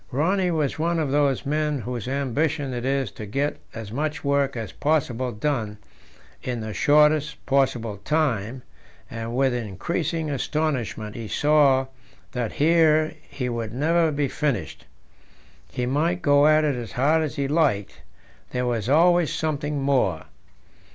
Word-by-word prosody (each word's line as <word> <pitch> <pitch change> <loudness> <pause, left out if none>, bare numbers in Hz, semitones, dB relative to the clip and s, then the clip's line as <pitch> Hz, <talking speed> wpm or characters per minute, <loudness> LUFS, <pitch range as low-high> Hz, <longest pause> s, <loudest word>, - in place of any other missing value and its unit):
Rönne 175 +5 +1
was 150 -1 -1
one 170 +1 +1
of 155 -4 -1
those 140 -2 +1
men 150 -1 0
whose 120 -1 -5
ambition 140 +1 -1
it 120 0 -4
is 135 -4 0
to 105 +1 -8
get 140 +8 -1 0.2
as 110 -3 -7
much 150 +4 -3
work 140 -2 +1
as 110 -1 -5
possible 130 -5 0
done 110 -3 -2 0.6
in 125 -2 -3
the 110 -1 -5
shortest 150 - +3
possible 125 -6 +1
time, 125 -2 -1 0.5
and 115 +1 -5
with 135 -1 +2
increasing 155 - -2
astonishment 130 -7 -2
he 115 -2 -6
saw 145 -1 +3 0.5
that 120 -3 -3
here 155 0 +3 0.2
he 140 -3 -4
would 115 -2 -3
never 165 +3 +2
be 145 -1 0
finished; 130 - -3 0.8
he 125 - -2
might 165 +7 0
go 145 0 +5
at 155 0 +5
it 150 -2 +1
as 120 -3 -6
hard 150 +6 +2
as 155 -2 -3
he 140 -2 -1
liked 140 -10 0 0.5
there 125 0 0
was 120 -2 -1
always 170 +2 +4
something 150 -2 -2
more. 125 - +1
140 Hz, 145 wpm, -24 LUFS, 120-155 Hz, 0.8 s, go